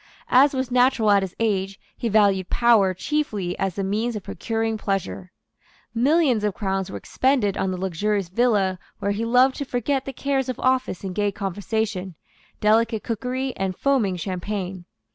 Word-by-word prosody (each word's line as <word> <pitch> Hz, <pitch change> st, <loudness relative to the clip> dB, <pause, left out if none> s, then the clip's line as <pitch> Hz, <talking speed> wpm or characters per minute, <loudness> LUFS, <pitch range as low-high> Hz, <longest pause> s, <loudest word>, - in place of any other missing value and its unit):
As 270 Hz, +3 st, +5 dB
was 260 Hz, -1 st, -2 dB
natural 250 Hz, -3 st, +3 dB
at 200 Hz, -1 st, +5 dB
his 190 Hz, -2 st, -5 dB
age, 195 Hz, -3 st, -1 dB, 0.2 s
he 235 Hz, -, -2 dB
valued 200 Hz, -3 st, +3 dB
power 230 Hz, -5 st, +4 dB
chiefly 210 Hz, -6 st, -2 dB
as 190 Hz, -2 st, -1 dB
the 200 Hz, -, -2 dB
means 215 Hz, +5 st, -1 dB
of 210 Hz, -, -5 dB
procuring 225 Hz, +1 st, -2 dB
pleasure. 170 Hz, -, -3 dB, 0.6 s
Millions 260 Hz, -1 st, +3 dB
of 205 Hz, -3 st, 0 dB
crowns 195 Hz, -2 st, -2 dB
were 100 Hz, -, -5 dB
expended 240 Hz, -, +1 dB
on 190 Hz, -, -1 dB
the 185 Hz, -, -3 dB
luxurious 190 Hz, +2 st, -1 dB
villa 195 Hz, -2 st, +1 dB, 0.2 s
where 200 Hz, -, -1 dB
he 205 Hz, +3 st, -2 dB
loved 250 Hz, +3 st, +4 dB
to 285 Hz, -, -2 dB
forget 265 Hz, +1 st, -1 dB
the 270 Hz, -, -4 dB
cares 270 Hz, -1 st, -1 dB
of 255 Hz, -, -4 dB
office 255 Hz, -7 st, 0 dB
in 190 Hz, -1 st, -4 dB
gay 205 Hz, +1 st, 0 dB
conversation, 200 Hz, -1 st, -3 dB, 0.4 s
delicate 220 Hz, +1 st, +2 dB
cookery 255 Hz, +3 st, -3 dB
and 190 Hz, -1 st, -3 dB
foaming 250 Hz, -9 st, +1 dB
champagne. 185 Hz, 0 st, -4 dB
210 Hz, 165 wpm, -23 LUFS, 190-250 Hz, 0.6 s, As